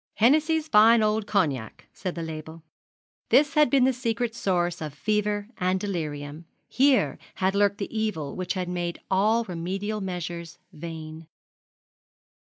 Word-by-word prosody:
'Hennessy's 310 +6 +3
Fine 225 -2 +6
Old 215 0 0
Cognac,' 145 - -1
said 185 - -5
the 170 - -4
label. 160 0 -8 0.7
This 295 +1 +4
had 300 -4 +5
been 270 0 +4
the 260 +1 +4
secret 235 -1 -2
source 175 -6 -1
of 150 -2 -5
fever 210 +3 -1
and 185 +1 +1
delirium 155 -5 -4 0.2
here 255 - +2 0.2
had 190 0 +1
lurked 200 0 +2
the 200 +2 -5
evil 210 -10 -2
which 185 0 -3
had 185 -1 -2
made 175 -1 -3
all 215 +5 +3
remedial 195 +3 -4
measures 175 -2 -5 0.2
vain. 160 0 -8
190 Hz, 140 wpm, -26 LUFS, 165-220 Hz, 0.7 s, Fine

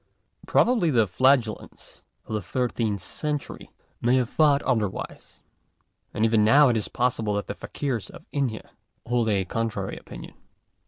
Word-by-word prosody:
Probably 230 -9 +3
the 120 -6 +3
Flagellants 125 +2 0 0.2
of - - -7
the 105 - -1
thirteenth 110 -1 -2
oentury 150 - -4 0.3
may 120 +2 +3
have 125 -2 0
thought 145 -2 +3
otherwise. 110 -7 -3 0.7
And 110 - 0
even 110 -1 +3
now 140 +6 +6
it 120 - +2
is 110 - -1
possible 115 -4 0
that 100 - -2
the - - -5
Fakeers 125 0 -4
of - - -13
India 130 -6 -3 0.3
hold 120 -2 +1
a 100 -3 +1
contrary 115 +4 -3
opinion. - - -10
115 Hz, 145 wpm, -25 LUFS, 110-135 Hz, 0.7 s, now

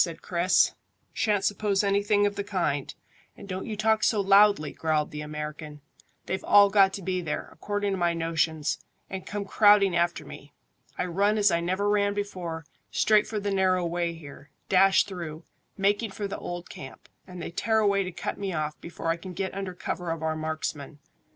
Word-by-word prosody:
said 165 -2 -6
Chris. 180 +1 +3 0.4
"Shan't 210 -3 +1
suppose 205 0 +1
anything 205 +1 +2
of 205 0 0
the 200 - -3
kind, 175 -9 -1 0.5
and - - -11
don't 185 -1 -5
you 215 -2 -4
talk 220 +1 +2
so 215 - +3
loudly," 200 -5 +5
growled 155 -2 -1
the 150 - -6
American. 150 0 -6 0.5
"They've 190 - -3
all 200 -1 +6
got 195 -2 +5
to 195 - -6
be 185 0 -1
there, 160 -3 -4
according 205 -1 -3
to 195 - -1
my 170 -1 +1
notions, 160 -2 -1 0.3
and 190 -1 -6
come 205 -1 -4
crowding 205 -2 +5
after 170 -2 0
me. 145 +1 -12 0.4
I - - -1
run 200 +4 +1
as 205 -1 +4
I 170 - +2
never 185 +4 -1
ran 205 -1 +2
before, 175 -6 -4 0.2
straight 215 -1 +3
for 215 - -3
the 205 0 -2
narrow 185 -2 +2
way 170 0 -2
here, 145 -2 -12 0.2
dash 195 +1 +5
through, 170 -4 -7 0.3
making 205 +3 +1
for 200 +1 -4
the 195 - -6
old 175 0 -6
camp, 135 -1 -11 0.2
and 180 -1 -9
they 170 - -5
tear 220 +5 0
away 200 -2 +3
to 185 -1 -3
cut - - -5
me 195 -2 -3
off 155 -1 -3
before 170 -1 -5
I 165 - +1
can 180 +2 -9
get 190 +2 -3
under 190 -2 -5
cover 180 -1 -4
of 165 -1 -3
our 160 0 0
marksmen. 155 -2 -4
185 Hz, 195 wpm, -27 LUFS, 165-200 Hz, 0.5 s, all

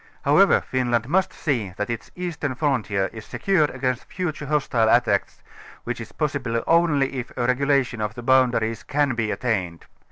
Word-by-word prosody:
However, - - +5
Finland 120 -3 -1
must 185 +5 +1
see 115 - -2
that 105 +3 -2
its 115 - -5
eastern 170 -7 -3
frontier 115 -9 0
is 110 -1 -8
secured 170 - +1
against 130 -2 -2
future 155 -5 -4
hostile 135 -7 +1
attacks, 120 +1 +1 0.4
which - - -4
is - - -9
possible 125 -6 -2
only 150 -5 +2
if 125 - -7
a 120 - 0
regulation 130 -2 +1
of 105 0 -3
the 120 - -8
boundaires 120 -3 +2
can 145 -2 0
be 115 -2 -1
attained. 95 -9 -2
125 Hz, 160 wpm, -23 LUFS, 115-145 Hz, 0.4 s, However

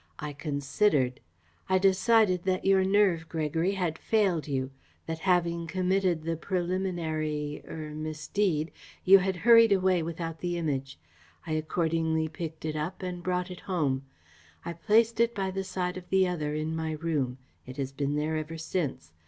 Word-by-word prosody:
I 150 -1 -5
considered. 145 -1 0 0.5
I 190 - +4
decided 190 0 +4
that 185 -1 0
your 195 -1 +5
nerve, 190 -4 +2
Gregory, 160 +3 0
had 180 -5 -2
failed 195 -9 +1
you, 130 -2 -2 0.3
that 160 0 -4
having 170 -2 +2
committed 185 -1 +1
the 165 +1 -1
preliminary 165 -5 -2
er 155 -1 -6
misdeed, 155 +2 -1 0.3
you 195 +1 +9
had 190 0 -1
hurried 230 -2 +8
away 185 -2 +3
without 165 0 -4
the 175 -1 -2
Image. 135 -5 -2 0.5
I 160 - -5
accordingly 160 0 0
picked 160 0 -7
it 155 -1 -2
up 160 +5 -4
and 180 -1 -4
brought 180 +1 -1
it 180 - -8
home. 145 -8 -1 0.6
I 170 - -3
placed 220 +6 +2
it 235 0 +3
by 195 -1 -1
the 195 +1 -3
side 180 -1 -3
of 180 -1 -10
the 190 -1 +4
other 150 -4 -2
in 155 +1 -2
my 160 -1 -2
room. 150 -6 -1 0.3
It 130 - -9
has 135 -1 -3
been 140 +1 -2
there 155 +2 -1
ever 155 +1 -5
since. 155 - -3
165 Hz, 160 wpm, -28 LUFS, 155-185 Hz, 0.6 s, you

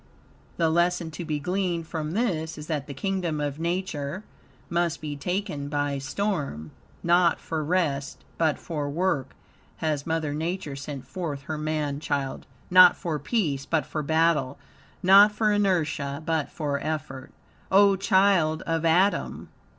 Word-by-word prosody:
The 165 -2 +2
lesson 175 0 +1
to 175 - -6
be 155 -2 -2
gleaned 180 +1 -1
from 155 -1 -4
this 165 -8 -1
is 150 - -7
that, 150 -4 -3
the 140 - -6
kingdom 180 -3 -2
of 145 0 -3
Nature 170 -1 -3 0.4
must 170 -1 0
be 150 -2 -5
taken 180 -2 -3
by 145 -1 -1
storm. 140 - -3 0.3
Not 175 0 +4
for 160 -1 -3
rest, 150 -4 -1
but 160 -3 +2
for 150 -4 -4
work, 155 -3 -1 0.4
has 150 -2 -2
Mother 160 -2 -1
Nature 160 -1 -3
sent 140 -1 -7
forth 145 -1 -5
her 155 - -4
man 150 -2 -2
child; 140 -3 -3 0.2
not 180 -1 +8
for 160 -4 -3
peace, 145 - -1
but 160 -2 +1
for 155 - -3
battle; 155 -3 +1 0.5
not 200 +3 +8
for 215 0 +1
inertia, 160 -8 0
but 160 -3 0
for 145 -3 -2
effort. 150 -4 -4 0.4
O 200 +1 +6
child 190 -5 +3
of 165 0 -1
Adam! 180 +5 +1
160 Hz, 145 wpm, -26 LUFS, 145-180 Hz, 0.5 s, not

